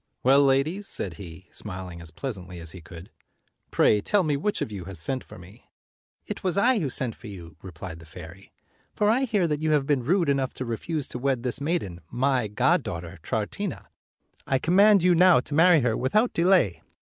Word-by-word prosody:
"Well, 135 +2 +6
ladies," 140 +9 +1
said 90 -4 -3
he, 90 0 -11
smiling 90 -4 -8
as 85 - -8
pleasantly 90 - -6
as 80 -1 -5
he 90 - -11
could, 85 +2 -12 0.6
"pray 105 - +3
tell 205 - +2
me 150 -3 0
which 205 +9 -1
of - - -3
you 95 -4 -6
has 95 -2 -6
sent 125 +12 -2
for - - -13
me." 95 +6 -16 0.3
" - - -57
It - - -6
was 185 0 0
I 240 +3 +4
who 150 -7 -1
sent 125 -2 -2
for 120 - -13
you," 90 -5 -10
replied 90 -2 -9
the 80 - -14
fairy; 85 +3 -12 0.4
"for 210 0 +3
I 260 +4 +2
hear 210 -8 +1
that 150 -1 -2
you 155 -1 +1
have 145 -2 +2
been 140 -3 +1
rude 175 +6 +2
enough 135 -2 0
to 130 - -5
refuse 140 +6 -3
to 125 - -5
wed 130 -2 0
this 125 +2 -2
maiden, 140 - -2
my 125 -1 +1
goddaughter 85 -5 -1
Troutina. - - -4 0.6
I 135 - +2
command 195 +6 +4
you 180 0 +5
now 180 -2 +6
to 145 - -9
marry 165 +1 +5
her 120 -3 +1
without 210 - +1
delay." 170 - +3
130 Hz, 205 wpm, -25 LUFS, -, 0.6 s, Well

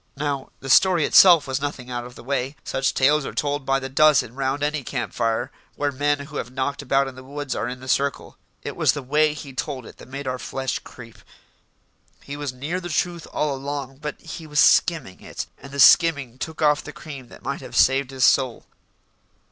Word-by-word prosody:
Now, 140 -2 -3
the 135 - -7
story 175 0 +5
itself 175 -5 +7
was 135 0 -2
nothing 135 -3 -5
out 120 0 -4
of 125 0 -11
the - - -12
way; 135 +1 -2
such 135 0 -1
tales 145 +3 +3
are - - -6
told 145 -2 -2
by 135 0 +2
the 130 - -5
dozen 140 -3 +4
round 135 +2 -2
any 150 -1 -1
camp 120 -1 -4
fire 115 -1 -1 0.2
where 145 0 -1
men 145 +1 0
who 145 +1 -8
have - - -4
knocked 135 +2 -3
about 135 0 +1
in 135 - -7
the 130 +1 -12
woods 145 +1 -5
are - - -2
in 125 +1 -6
the 130 - -10
circle. 140 +1 -1 0.3
It - - -5
was - - +3
the 145 - -5
way 150 +3 +2
he 140 -2 -9
told 130 -2 -4
it - - -13
that - - -13
made 140 +2 -7
our 130 -1 -3
flesh 130 0 -3
creep. 115 -3 -13 1.0
He 140 - -7
was 145 -2 -4
near 145 +8 -4
the 175 -1 -7
truth 170 +1 -2
all 150 -2 0
along, 135 -1 -5
but 150 +1 -6
he 160 - -9
was 150 -1 0
skimming 155 - +3
it, - - -6 0.2
and 140 - -11
the 140 - -6
skimming 140 -4 +5
took 160 +3 -4
off 150 -1 +3
the - - -8
cream 140 -6 -9
that - - -15
might - - -4
have - - -9
saved 135 0 +4
his 135 -1 -2
soul. 130 -4 +3
140 Hz, 220 wpm, -23 LUFS, 130-150 Hz, 1.0 s, itself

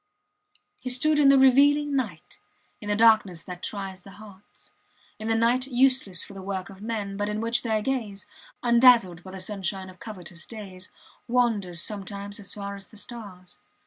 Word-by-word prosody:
He 255 - -5
stood 295 +5 +3
in 280 -2 +6
the 275 - +7
revealing 285 +2 +5
night 205 - -4 0.4
in 210 - -7
the 205 - +2
darkness 215 -6 +4
that 180 -1 -9
tries 195 -2 -5
the 195 +1 -14
hearts, 205 -2 -15 0.5
in 220 - -5
the 225 - +2
night 240 +3 +2
useless 255 -8 +2
for - - -11
the 195 - -9
work 190 0 -5
of 195 0 -14
men, 210 -3 -4
but 205 0 -1
in 210 0 -2
which 230 +2 +1
their 220 -3 -1
gaze, 220 -7 -3 0.4
undazzled 235 -7 +5
by 185 - -11
the 190 0 -8
sunshine 190 -1 -3
of 185 - -20
covetous 175 -6 -8
days, 195 -4 -9 0.4
wanders 215 -8 +1
sometimes 200 0 -5
as 200 - -7
far 200 -1 -5
as 200 -1 -7
the 215 - -14
stars. 200 -6 -9
210 Hz, 175 wpm, -26 LUFS, 190-240 Hz, 0.5 s, the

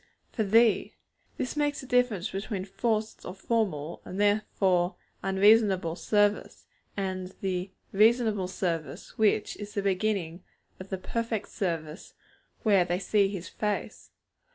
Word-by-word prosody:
'For 225 - -2
Thee!' 225 +2 +3 0.4
This 255 - -3
makes 290 -1 0
the - - -10
difference 245 -7 +1
between 195 0 -4
forced 220 +1 -2
or 180 - -7
formal, 195 -8 -1
and 190 - -7
therefore 195 -3 +2 0.3
unreasonable 195 -3 +4
service, 205 +3 0 0.3
and 185 -1 -3
the 185 -1 -2 0.2
'reasonable 215 -2 +3
service' 165 -6 -4
which 215 -1 +2
is 205 +1 -8
the 200 - -1
beginning 190 -3 -1 0.4
of 185 +1 -9
the 190 - -2
perfect 225 +2 -3
service 165 -3 -4 0.5
where 200 -5 +5
they 175 0 -1
see 200 +1 +2
His 185 -3 -6
face. 210 +2 -3
200 Hz, 130 wpm, -28 LUFS, 185-215 Hz, 0.5 s, where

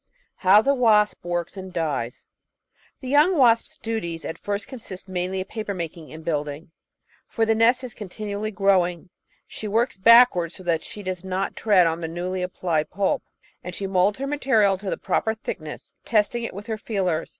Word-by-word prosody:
How 200 +3 +6
the 275 - +3
Wasp 220 -5 +3
Works 175 +1 -3
and 190 -1 -7
Dies 150 -9 -3 0.8
The 260 - -7
young 300 +7 +4
wasp's 235 -4 +3
duties 170 -8 -4
at - - -5
first 205 0 -3
consist 200 -8 -9
mainly 185 0 -2
of 185 - -7
paper 215 -3 -4
making 165 -2 -6
and 160 0 -10
building, 150 0 -3 0.6
for 225 - 0
the 225 - +3
nest 235 +3 +3
is 250 -3 -7
continually 210 +1 -5
growing. 185 -4 +1 0.3
She 215 - -7
works 225 -1 0
backwards 225 -6 +6
so 185 - -11
that 170 -2 0
she 205 - -8
does 185 -1 -4
not 190 +1 -2
tread 200 -5 +4
on 165 +1 -1
the 165 - -2
newly 180 +3 -3
applied 175 -3 -1
pulp, 200 0 0 0.4
and 180 0 -6
she 200 - -4
moulds 190 +1 +2
her 275 - -3
material 260 -9 +2
to 195 -1 -5
the - - -2
proper 220 0 0
thickness, 155 -8 -7
test 210 -3 +2
ing 235 -1 -2
it - - -6
with 205 +1 -7
her 220 -2 -4
feelers. 185 -7 -1
195 Hz, 185 wpm, -24 LUFS, 175-220 Hz, 0.8 s, How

